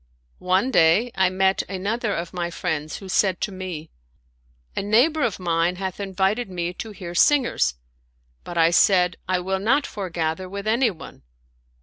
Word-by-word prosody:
One 190 +8 +1
day, 205 +7 +4
I 190 -1 +2
met 190 +1 +2
another 205 +4 -2
of 170 +1 -5
my 175 -1 -2
friends 160 -3 -3
who 195 - -10
said 185 -1 +1
to 210 - -1
me, 185 -4 -7 0.4
" - - -39
A - - -1
neighbor 245 +11 +3
of 235 -8 0
mine 170 0 +1
hath 190 0 -5
invited 195 +3 -1
me 175 -1 -3
to 220 - -7
hear 185 -4 -8
singers," 240 - +3 0.7
but 175 - -7
I 165 0 +5
said: 180 -1 +4
" - - -40
I 185 -1 +2
will 190 +1 -2
not 265 +8 +2
foregather 175 -2 -3
with 200 +1 -6
anyone." 220 -5 -1
185 Hz, 165 wpm, -23 LUFS, 170-205 Hz, 0.7 s, I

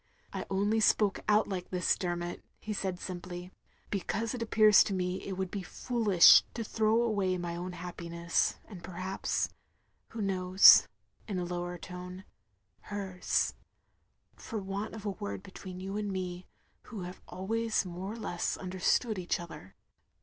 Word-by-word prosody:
"I - - -4
only 205 +3 +1
spoke 210 -2 +3
out 210 +1 +4
like 185 -3 -4
this, 180 -1 +1
Dermot, 175 -1 -3
" - - -42
he 215 - -4
said 190 -3 -3
simply, 180 0 -7 0.4
"Becatise 210 +4 -2
it 245 - -5
appears 215 -2 +6
to 195 - -2
me 180 0 -1
it 195 - -5
wotdd 190 -1 -3
be 200 - -3
foolish 210 -3 +6
to 230 - -2
throw 220 +1 +2
away 200 -5 +1
my 175 -1 -4
own 180 +1 -5
happiness, 170 -1 -1
and 185 -6 -11
perhaps 185 +2 -2 0.3
— - - -44
who 225 - -8
knows 185 - +7 0.2
— - - -36
(in 200 -4 -3
a 180 - -1
lower 175 0 -4
tone) 180 +2 -8 0.7
hers, 195 -3 -1 0.8
for 225 - -6
want 200 +2 -4
of 215 -1 -9
a 205 - 0
word 200 -1 -6
between 185 -1 -9
you 195 +1 -5
and 205 -1 -2
me, 180 -1 -4 0.4
who 215 -5 -7
have 180 +1 -8
always 220 +4 -1
more 185 +3 -5
or - - -8
less 175 -6 -2
understood 185 +4 0
each 175 -1 -1
other. 165 - -10
190 Hz, 165 wpm, -31 LUFS, 180-210 Hz, 0.8 s, knows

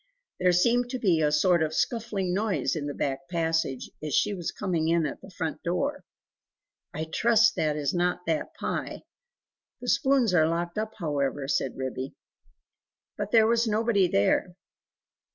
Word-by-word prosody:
There 180 0 +4
seemed 240 +7 +2
to 255 - -3
be 185 -9 +2
a 150 -1 +2
sort 170 +3 +3
of 155 0 -1
scuffling 215 -6 -1
noise 190 - 0
in 145 -2 -3
the 145 - -3
back 135 -1 -3
passage, 165 -6 -1
as 150 -3 -2
she 210 - +2
was 175 -4 -4
coming 170 -5 -1
in 165 -1 +2
at 145 - -5
the - - -12
front 165 -3 -4
door. 280 +12 -2 0.9
"I 155 - -4
trust 225 +7 +3
that 150 -1 +1
is 145 -2 -1
not 180 0 0
that 160 -2 -2
Pie: - - -4 0.8
the - - -8
spoons 265 - +3
are 160 -3 +4
locked 170 +4 -2
up, 220 0 -3
however," 145 -5 -2
said 135 -2 -1
Ribby. 130 0 -4 1.0
But - - -4
there 225 -2 +6
was 230 +1 +2
nobody 215 -3 +2
there. 175 - +1
175 Hz, 165 wpm, -27 LUFS, 155-215 Hz, 1.0 s, there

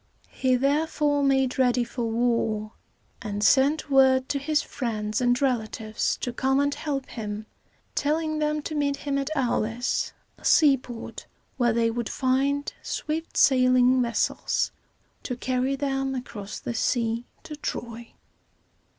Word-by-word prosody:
He 255 -1 +1
therefore 290 +2 +1
made 265 -2 +2
ready 250 -1 +3
for 240 0 -4
war, 225 -2 0 0.5
and 210 -2 -3
sent 285 +4 +3
word 265 -1 +5
to 280 - 0
his 300 +2 +1
friends 215 -3 -3
and 245 0 +2
relatives 220 -4 -1
to 245 - -3
come 265 +2 +1
and 285 0 +1
help 280 -4 -3
him, 210 -2 -6 0.5
telling 310 +1 0
them 300 0 0
to 310 - -4
meet 285 -2 0
him 280 -1 -2
at 275 +1 -2
Au´lis, 245 -2 0 0.3
a - - -21
seaport, 265 -6 +2 0.3
where 240 -2 +3
they 230 0 +2
would 235 -1 -3
find 275 +2 0
swift 320 +2 -4
sailing 255 -1 +5
vessels 235 -1 0 0.5
to 250 - -4
carry 255 +2 0
them 270 -1 -1
across 210 -5 -6
the 240 - -4
sea 230 0 0 0.2
to 300 - -7
Troy. 235 -5 -6
260 Hz, 135 wpm, -26 LUFS, 235-280 Hz, 0.5 s, word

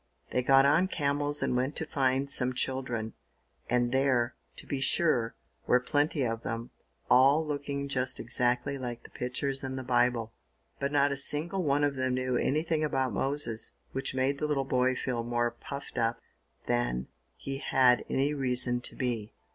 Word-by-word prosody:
They 125 - +1
got 135 +2 +5
on 160 +6 +4
camels 145 -3 +1
and - - 0
went 130 +4 0
to 160 - -2
find 135 -1 0
some 130 -2 +1
children, 125 -4 -2 0.6
and 120 0 +2
there, 130 -3 +2 0.2
to - - -9
be 140 -2 -3
sure, 125 -7 +2 0.3
were 125 - +5
plenty 145 +3 0
of 115 -1 -2
them, 115 +1 -5 0.4
all 140 +5 +5
looking 140 -1 -3
just 130 -2 -1
exactly 125 +4 0
like 120 -2 -5
the - - -14
pictures 135 +2 -3
in 130 0 -4
the 130 - -4
Bible; 120 -2 +1 0.5
but 140 0 -1
not 145 -1 +3
a - - 0
single 155 +7 +2
one 145 -3 +1
of 145 -1 +2
them 130 -1 0
knew 130 0 -1
anything 155 +5 0
about 135 -5 0
Moses, 135 -3 -2 0.2
which 135 0 -3
made 135 +2 0
the 150 - 0
little 140 -3 0
boy 130 -1 +2
feel 125 -2 -2
more 120 0 0
puffed 140 +4 -7
up 115 0 0 0.5
than - - -1 0.3
he 135 0 -6
had 130 -3 +3
any 140 +2 +1
reason 125 -3 +1
to - - -4
be. 115 -5 -3
130 Hz, 170 wpm, -29 LUFS, 125-140 Hz, 0.6 s, got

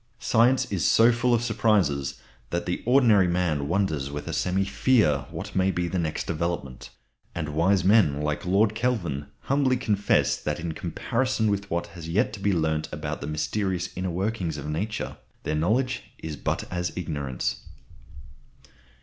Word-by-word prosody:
Science 120 +3 +3
is 95 -6 -1
so 115 +2 +6
full 120 +1 +1
of 120 -1 +2
surprises 100 - +1 0.3
that 85 0 -2
the 90 - -2
ordinary 115 -7 +5
man 85 -5 0
wonders 80 -6 0
with 75 0 -6
a - - -3
semi 95 +2 +1
fear 95 - +2
what - - -7
may 95 0 +3
be 90 -1 -1
the 90 +1 -1
next 80 -2 -2
development; 85 -6 -3 0.5
and 75 -3 -3
wise 85 +5 +2
men 95 -8 +4
like 75 0 -2
Lord 100 +4 +3
Kelvin 100 - -1
humbly 135 -2 +2
confess 105 -5 +2
that 75 +3 -3
in 85 -1 -3
comparison 115 +8 -1
with 100 0 -2
what 85 +1 -1
has 85 -3 -8
yet 105 +6 +1
to 110 - -7
be 100 +1 +1
learnt 80 -3 0
about - - -4
the 70 - -4
mysterious 90 +4 -2
inner 95 +1 -2
workings 90 -3 -2
of 70 - -6
Nature 100 +9 -3 0.3
their 75 - -2
knowledge 110 +12 +1 0.2
is 80 -2 -6
but - - -2
as 90 0 -2
ignorance. 70 -8 -3
90 Hz, 165 wpm, -26 LUFS, 75-110 Hz, 0.5 s, so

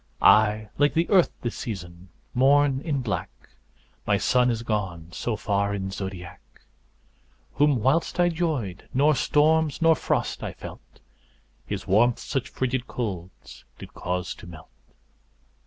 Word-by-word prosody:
I, 110 0 +5
like 145 +2 +3
the 165 +1 +2
Earth 185 -4 +5
this 120 - -3
season, 90 -4 -7 0.2
mourn 135 +1 +4
in 140 -5 -1
black, 105 -4 -2 0.8
My - - +3
Sun 125 0 +3
is 115 -1 -2
gone 95 -7 -3
so 115 +6 -3
far 100 -1 0
in's 95 -1 -4
zodiac, 95 -3 -7 1.1
Whom 145 0 +3
whilst 155 +7 +1
I 175 0 +4
'joyed, 155 - -3
nor 145 +3 +4
storms, 155 +3 +2
nor 165 -1 +5
frost - - -1
I - - -5
felt, - - -12 0.7
His - - -4
warmth 115 +5 +3
such 135 -4 -4
fridged 130 -1 -2
colds 95 -7 -6
did - - -11
cause 90 0 -3
to - - -13
melt. 80 -2 -12
120 Hz, 140 wpm, -25 LUFS, 95-145 Hz, 1.1 s, I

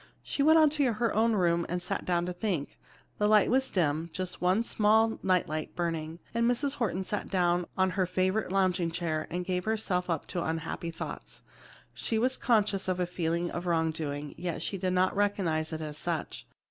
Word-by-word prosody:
She - - -2
went 315 +3 +6
on 310 -2 +6
to 285 -5 +2
her 225 +1 0
own 225 +2 +3
room 170 -4 +2
and 180 +1 -1
sat 175 - -4
down 175 -1 +1
to 180 - -3
think. 175 -5 -3 0.4
The 210 - +3
light 215 0 +5
was 265 +1 +2
dim; 160 -2 0
just 185 0 -4
one 185 +5 +3
small 220 0 +3
night 185 -2 +2
light 155 +1 -4
burning, 165 -2 -2 0.2
and 235 +1 +2
Mrs. 275 +3 0
Horton 190 -6 -1
sat 205 +2 -3
down 175 -1 +1
in 190 0 +3
her 185 -1 0
favorite 185 +3 0
lounging 185 -3 +2
chair 165 -2 -2
and 180 +1 -3
gave 180 -1 -1
herself 205 -5 -1
up 165 - -1
to 180 - -2
her 160 - -2
unhappy 165 +1 -3
thoughts. 165 - -7 0.5
She 225 - -2
was 255 +3 +2
conscious 210 -6 +1
of 185 -1 0
a 180 - +2
feeling 170 0 -1
of 175 +1 -4
wrongdoing 160 -3 -1
yet 175 -2 -3
she 195 - -3
did 185 0 0
not 185 +1 +2
recognize 180 -6 0
it 160 0 -4
as 155 -1 -5
such. 170 -3 -4
180 Hz, 200 wpm, -29 LUFS, 170-210 Hz, 0.5 s, went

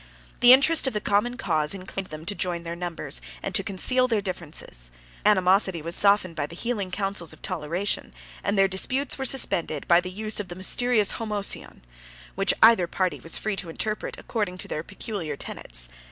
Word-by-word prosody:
The 245 0 +7
interest 275 +3 +6
of 265 - -1
the 210 - -1
common 210 +5 0
cause 160 - 0
inclined 190 0 -6
them 155 +1 -9
to 200 - -1
join 175 -3 -3
their 170 0 -5
numbers, 170 - -2 0.2
and - - -4
to - - +4
conceal 255 +7 +1
their 225 -4 +1
differences; 165 - -3 0.3
their 210 - +6
animosity 190 -1 +2
was 170 +2 -2
softened 200 -4 +3
by 145 -2 -2
the 170 - -11
healing 210 -2 -3
counsels 195 -3 -3
of - - -18
toleration, 175 +3 -2 0.3
and 205 - -1
their 195 0 +5
disputes 255 +10 -1
were 265 - -2
suspended 170 - +1
by 170 0 +5
the 180 - -6
use 215 +3 -1
of 205 - -5
the 175 - -8
mysterious 215 +3 +3
Homoousion, 210 - -1 0.5
which 195 0 +2
either 225 -6 +6
party 180 -5 -2
was 165 +5 -1
free 215 -1 -2
to 180 - -5
interpret 215 +6 -3
according 205 -6 -3
to - - -5
their 155 - -4
peculiar 195 - -6
tenets. - - 0
190 Hz, 190 wpm, -25 LUFS, 170-215 Hz, 0.5 s, The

